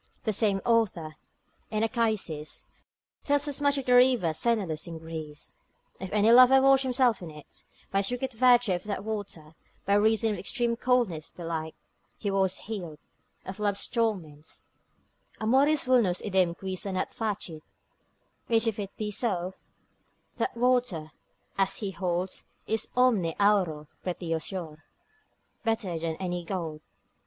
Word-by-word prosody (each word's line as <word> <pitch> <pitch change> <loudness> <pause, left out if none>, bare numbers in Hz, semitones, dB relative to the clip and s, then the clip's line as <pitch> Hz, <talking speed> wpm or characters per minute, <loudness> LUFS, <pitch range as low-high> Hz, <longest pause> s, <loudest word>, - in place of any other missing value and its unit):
The 215 - 0
same 200 -2 +2
author, 190 -10 +1 0.5
in 215 0 0
Achaicis, 215 -10 -2 0.5
tells 285 0 +1
as 290 0 -3
much 285 0 +3
of 275 - -3
the 250 - +3
river 245 -9 +5
Senelus 185 -6 -1
in 165 -1 -6
Greece; 160 -2 -7 0.5
if 190 0 -6
any 215 +2 +4
lover 255 +2 +8
washed 270 0 +5
himself 255 -4 +2
in 175 - -7
it, 150 -1 -11 0.3
by 195 - +2
a - - +1
secret 250 +4 -2
virtue 245 -3 +4
of 175 - -3
that 205 -2 -3
water, 200 -8 -6 0.3
(by 200 - +2
reason 220 +2 +3
of - - -1
the - - -7
extreme 235 +3 0
coldness 230 -11 0
belike) 165 -2 -5 0.4
he 205 - -2
was 190 -1 +1
healed, 180 -8 -6 0.5
of 190 +2 -7
love's 205 -1 +1
torments, 180 -11 -3 0.8
Amoris 270 +7 +3
vulnus 235 -9 +3
idem 185 -4 +1
qui 190 -1 -4
sanat 185 0 -3
facit; 200 -8 -4 0.9
which 225 0 +3
if 225 -2 -1
it 200 -1 -6
be 210 -1 -3
so, 190 -5 -1 0.8
that 385 - -2
water, 240 -11 +1 0.5
as 195 0 +2
he 200 -1 -4
holds, 180 0 -3 0.2
is 220 0 -1
omni 215 -10 +3
auro 185 -8 +2 0.2
pretiosior, 170 -2 -4 0.9
better 215 -7 -1
than 165 0 -2
any 175 0 -3
gold. 165 -4 -4
200 Hz, 145 wpm, -28 LUFS, 170-235 Hz, 0.9 s, lover